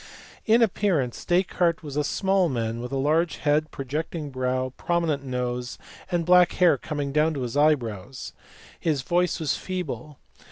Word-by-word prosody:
In 230 +2 +5
appearance, 180 - 0
Descartes 175 -2 +1
was 145 -2 -7
a 150 - +1
small 190 +3 +1
man 115 -2 -2
with 125 +1 -6
large 150 +5 +1
head, 150 +1 +1
projecting 150 +2 -4
brow, 130 0 -1
prominent 165 -5 0
nose, 125 -1 -3 0.3
and 175 -2 0
black 180 0 +5
hair 180 -5 +4
coming 145 +1 -4
down 155 +2 +2
to 135 - -3
his 120 +1 -4
eyebrows. 130 -6 0 0.5
His 150 -5 0
voice 175 +3 +1
was 155 -3 0
feeble. 150 -7 -5
150 Hz, 150 wpm, -25 LUFS, 130-170 Hz, 0.5 s, In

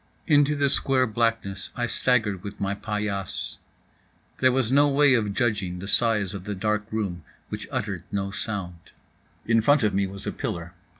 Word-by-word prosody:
Into 145 -2 +4
the 145 -1 +2
square 130 -1 +2
blackness 110 -4 -1
I 120 - 0
staggered 110 -4 +1
with 100 - -8
my 100 0 0
paillasse. 105 -2 -3 0.8
There 130 0 +5
was 125 -2 +1
no 145 +2 +5
way 140 0 +5
of 105 -5 +1
judging 100 -8 0
the 95 +2 -7
size 105 -4 +2
of 100 -2 -7
the 105 -1 -3
dark 105 +2 -1
room 100 -6 -2 0.3
which - - -5
uttered - - -3
no 100 -1 -2
sound. 95 -6 -5 0.5
In 115 0 +3
front 145 +3 +4
of 105 - +2
me 100 0 +1
was 100 +1 -9
a - - -1
pillar. 85 0 -5
105 Hz, 175 wpm, -25 LUFS, 100-125 Hz, 0.8 s, There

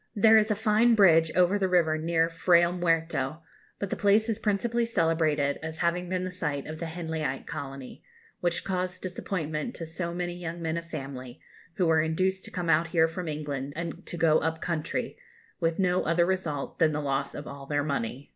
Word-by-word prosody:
There 220 +1 +6
is 215 +1 0
a 210 - +2
fine 220 +2 +3
bridge 165 -6 +5
over 180 +3 +3
the 190 -1 +1
river 170 -3 +3
near 165 +1 +1
Frayle 170 +1 +3
Muerto, 165 -4 -1 0.3
but 200 - -4
the - - 0
place 210 +3 +3
is 225 -1 -1
principally 230 +3 0
celebrated 160 -8 +1
as 160 0 -6
having 175 +1 0
been 185 0 -1
the 185 - -3
site 150 -6 -3
of 155 0 -7
the 165 - -3
Henleyite 160 -5 -3
colony, 135 -2 -7 0.4
which 175 -1 0
caused 185 -1 -3
disappointment 180 +1 -3
to 165 - -6
so 170 +2 -4
many 175 0 -3
young 175 -1 -6
men 165 -1 -2
of 170 0 -5
family, 135 -5 -7 0.4
who 185 - +1
were 160 -1 +4
induced 185 +4 0
to - - -8
come 180 -1 -3
out 165 +1 +3
here 165 -1 +3
from 170 +2 -5
England 145 -2 -4
and 170 0 -5
to 175 - -3
go 160 -1 +4
up 160 0 -2
country, 165 - -3 0.4
with 165 -2 0
no 180 -1 +2
other 170 +1 +2
result 170 -7 -2
than 160 -2 +4
the 150 - -1
loss 140 -1 -2
of - - -6
all 140 -1 -9
their 145 0 0
money. 140 -2 -3
165 Hz, 200 wpm, -28 LUFS, 155-180 Hz, 0.4 s, There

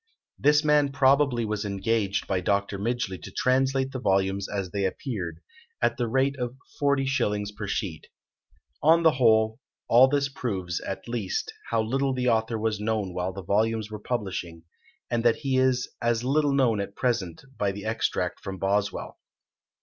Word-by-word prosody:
This 150 +1 +4
man 150 -2 +3
probably 135 -3 +3
was 105 -1 -2
engaged 100 0 -1
by 95 -2 0
Dr. 100 +1 0
Midgeley 105 -5 -2
to - - -8
translate 135 +1 +1
the 130 - -4
volumes 95 -2 +1
as 100 -3 -3
they 100 0 -1
appeared, 95 - -4 0.4
at - - +1
the 120 - 0
rate 135 +4 +1
of 125 0 -3 0.3
40s. 135 -8 +1
per 105 - -5
sheet. 95 -5 -3 0.7
On 165 +2 +5
the 160 - +6
whole, 110 -3 +3 0.3
all 125 +3 +7
this 140 0 +1
proves, 95 -10 -3
at 95 - -6
least, 115 -6 -3 0.2
how 115 -1 +1
little 135 +4 0
the 125 -1 +1
author 110 0 +1
was 110 -1 -1
known 105 -3 -1
while 90 +1 -2
the 95 0 -8
volumes 110 +3 0
were 105 - -5
publishing, 95 -8 -4 0.5
and 120 -1 +1
that 120 -1 +4
he 135 -2 -1
is 130 -1 +2
as 115 0 +1
little 145 +3 +2
known 125 -6 +2
at 100 0 -4
present 105 -9 -1 0.2
by 100 -1 +1
the 100 +1 -8
extract 110 +1 -1
from 95 -1 -6
Boswell. 100 +1 -1
110 Hz, 165 wpm, -26 LUFS, 100-130 Hz, 0.7 s, all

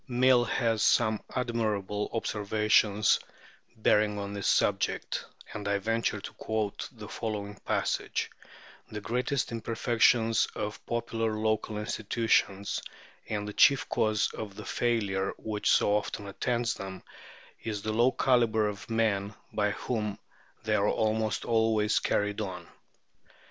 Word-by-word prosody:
Mill 125 -1 +4
has 115 -1 0
some 110 -2 +3
admirable 110 -5 -1
observations 105 -1 +2 0.6
bearing 105 -1 +3
on 100 0 -4
this 100 -1 -2
subject, - - +1 0.3
and 105 -1 -5
I 100 0 +2
venture 115 +1 0
to - - -8
quote 110 -2 -3
the 110 -5 -10
following 105 -2 -4
passage: - - -1 0.6
"The 105 - -5
greatest 125 +4 -1
imperfection 115 0 +2 0.2
of 105 0 -4
popular 115 -2 -1
local 110 0 -1
institutions, 105 -2 0 0.5
and 105 -1 -2
the 105 - -5
chief 140 +4 +5
cause 110 -1 +1
of 105 -3 -6
the - - -8
failure 100 -5 0
which 105 -1 -2
so 105 - +4
often 105 0 -2
attends 115 +4 -1
them, 95 -1 -7 0.6
is 105 -3 -3
the 110 - -1
low 120 +4 +4
calibre 115 -6 +2
of 100 - -11
the 115 - -4
men 105 -2 +1 0.2
by 105 -1 +1
whom 105 -1 -3 0.5
they - - 0
are - - +3
almost 110 0 0
always 110 -2 +2
carried 105 +1 0
on. 95 -3 -5
110 Hz, 130 wpm, -29 LUFS, 105-115 Hz, 0.6 s, chief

